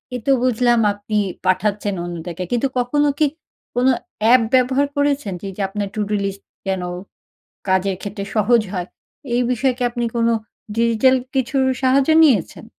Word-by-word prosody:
এ - - 0
তো 275 - +3
বুঝলাম 240 -1 +3
আপনি 205 +1 -4 0.3
পাঠাচ্ছেন 205 +2 0
অন্যদেরকে। 175 0 -5
কিন্তু 245 +3 +1
কখনো 290 +4 +1
কি 310 - +5 0.5
কোনো 250 +2 +4 0.3
অ্যাপ 235 +3 +6
ব্যবহার 260 +2 +3
করেছেন 285 -8 0
যে, 200 - -6
যে 205 - -3
আপনার 205 0 -3
টুডু 210 -1 -1
লিস্ট 195 0 -4 0.2
যেন, 190 -1 -1 0.9
কাজের 190 +1 +1
ক্ষেত্রে 200 -1 -5
সহজ 225 +2 +4
হয়? 180 -1 -3 0.5
এই 245 - +2
বিষয়ে 255 +1 +1
কি 255 - -2
আপনি 240 0 -2
কোনো 230 0 +2 0.4
ডিজিটাল 230 +3 +3 0.2
কিছুর 265 +1 +1 0.2
সাহায্য 265 +2 +3
নিয়েছেন? 225 - +2
230 Hz, 150 wpm, -20 LUFS, 200-255 Hz, 0.9 s, অ্যাপ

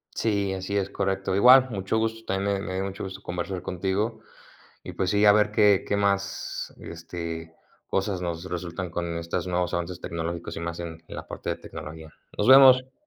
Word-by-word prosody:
Sí, 100 -3 0
así 95 +1 -4
es, 95 -1 -1
correcto. 95 -1 -1
Igual, 130 +5 +7
mucho 100 0 -2
gusto, 115 0 -2
también 100 +1 0
me 100 - -1
me 95 - -4
dio 95 - -1
mucho 100 0 -5
gusto 95 0 -8
conversar 90 +1 -4
contigo 95 +5 -2 0.7
y, - - -7
pues, 95 -1 -1
sí, 105 +1 +3
a 105 - +8
ver 105 0 +3
qué 105 -3 +4
qué 100 - +1
más, 100 0 -1
este, 85 -1 -7 0.3
cosas 95 -1 -1
nos 85 -1 -4
resultan 90 0 -5
con 85 0 -3
estos 85 +2 -3
nuevos 90 0 -1
avances 85 +1 -3
tecnológicos 85 0 -4
y - - -4
más 85 0 -4
en 80 -1 -7
en - - -9
la - - -7
parte - - -5
de - - -2
tecnología. 80 0 -9 0.2
Nos 105 - 0
vemos. 130 -1 +8
95 Hz, 195 wpm, -26 LUFS, 85-100 Hz, 0.7 s, a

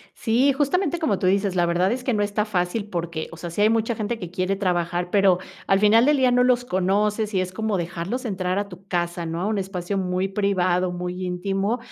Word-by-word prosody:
Sí, 250 +5 +2
justamente 300 +5 0
como 220 - 0
tú - - -1
dices, 195 0 +2
la 175 -1 +3
verdad 175 +4 +1
es 250 +1 -3
que 255 - +1
no 205 - +1
está 205 +1 0
fácil 200 +1 -2
porque, 170 -4 -4
o - - -9
sea, 170 +1 -6
sí 170 - -4
hay 210 - +5
mucha 225 +1 +1
gente 220 +2 -3
que 180 -6 -7
quiere 185 +2 -1
trabajar, 175 -2 -1
pero 195 -2 +4 0.3
al 195 0 +3
final 220 +4 +5
del 295 0 +4
día 260 -2 +3
no 250 0 +4
los 250 -1 +3
conoces 210 +2 0
y 190 - +2
es 185 0 -3
como 220 +1 -1
dejarlos 175 +8 -3
entrar 185 -4 -1
a 205 0 -2
tu 185 0 -13
casa, 175 -1 -2
¿no? 165 +1 -3
A - - 0
un 215 -1 0
espacio 190 0 -3
muy 185 0 -1
privado, 185 -2 +1
muy 180 +1 -4
íntimo. 195 +5 -1
195 Hz, 230 wpm, -23 LUFS, 180-220 Hz, 0.3 s, hay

